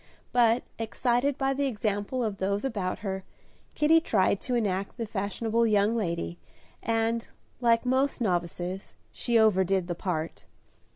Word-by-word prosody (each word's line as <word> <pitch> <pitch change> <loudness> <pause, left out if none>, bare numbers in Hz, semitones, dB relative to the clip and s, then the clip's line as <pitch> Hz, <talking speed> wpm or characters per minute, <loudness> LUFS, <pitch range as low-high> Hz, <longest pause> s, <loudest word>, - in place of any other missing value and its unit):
But, 240 -1 +4 0.2
excited 245 +4 +1
by 270 0 +1
the 280 +1 0
example 215 +1 -1
of 210 -3 -3
those 200 +4 0
about 200 -8 -2
her, 190 -1 -2 0.5
Kitty 310 +2 +5
tried 200 - +2
to 250 - -1
enact 200 -3 -1
the 230 - -2
fashionable 220 +3 0
young 210 +1 +3
lady, 175 -5 -2 0.4
and, 225 +1 0 0.3
like 235 -1 +3
most 260 +2 +1
novices, 180 -2 -2 0.2
she 235 -1 +1
overdid 190 -4 +3
the 175 - -2
part. 165 -2 -4
220 Hz, 135 wpm, -28 LUFS, 190-240 Hz, 0.5 s, Kitty